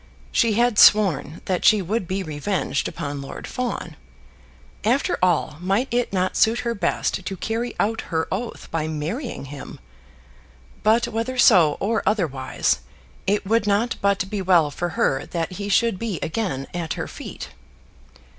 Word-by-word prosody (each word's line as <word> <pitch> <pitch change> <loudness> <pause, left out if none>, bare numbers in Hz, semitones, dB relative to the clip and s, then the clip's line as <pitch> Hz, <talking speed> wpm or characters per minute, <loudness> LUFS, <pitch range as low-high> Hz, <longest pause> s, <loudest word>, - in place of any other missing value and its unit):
She 230 -3 +3
had 235 -1 +2
sworn 190 -6 +5
that 185 -2 -1
she 215 - +6
would 195 +1 -2
be 190 +2 -2
revenged 160 +5 -2
upon 145 -4 -5
Lord 135 - -8
Fawn. 235 -10 -4 0.9
After 245 +6 +2
all, 175 -4 +1
might 195 +9 0
it 240 0 0
not 185 -1 0
suit 225 +2 +3
her 235 -1 -1
best 190 -1 -1
to 190 +1 -5
carry 230 +5 -3
out 225 +2 +1
her 160 -1 0
oath 225 +5 -4
by 160 -1 -1
marrying 160 - -4
him? 140 0 -9 1.0
But 225 +3 +3
whether 230 +4 -3
so 180 -11 +6
or 220 +3 0
otherwise, 160 -11 0 0.5
it 205 +1 +1
would 220 +1 +1
not 210 +4 +1
but 200 -1 +1
be 200 0 -3
well 175 -5 +4
for 175 +5 -3
her 135 0 +1
that 165 -1 -3
he 200 +2 -5
should 225 -1 +2
be 220 -6 -2
again 160 -7 -2
at 170 -3 -3
her - - -4
feet. - - -8
195 Hz, 155 wpm, -23 LUFS, 165-225 Hz, 1.0 s, she